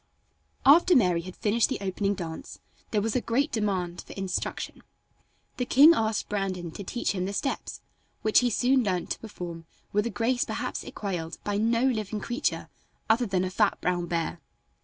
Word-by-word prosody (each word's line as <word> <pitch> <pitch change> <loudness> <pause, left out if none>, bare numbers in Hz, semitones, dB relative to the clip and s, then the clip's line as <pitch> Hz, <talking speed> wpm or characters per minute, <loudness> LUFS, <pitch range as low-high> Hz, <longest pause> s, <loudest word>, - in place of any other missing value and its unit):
After 340 +6 +7
Mary 180 -8 +4
had 185 +1 -9
finished 225 +2 +2
the 265 - -1
opening 200 +1 -1
dance 165 -4 -7 0.3
there 210 -2 0
was 225 -1 -1
a 250 - +2
great 275 +7 0
demand 185 -5 -1
for - - -11
instruction. 190 -1 -3 0.8
The 250 - -1
king 290 +7 +8
asked 220 -7 0
Brandon 185 -4 -2
to 200 - -7
teach 240 +5 -1
him 185 -2 -2
the 200 - -3
steps, 275 +7 -3 0.4
which 215 - +5
he 245 - +2
soon 255 +3 +3
learned 185 -4 -1
to - - -2
perform 175 -6 -7 0.3
with 210 +3 +2
a - - -2
grace 235 +3 +1
perhaps - - -4
equaled 175 -5 -4
by 205 -1 -1
no 230 +2 +2
living 215 -5 0
creature 240 +8 -2 0.4
other 235 +2 +2
than 185 -2 +1
a 185 - -2
fat - - +2
brown 175 -1 -1
bear. 165 0 -2
205 Hz, 180 wpm, -27 LUFS, 185-235 Hz, 0.8 s, king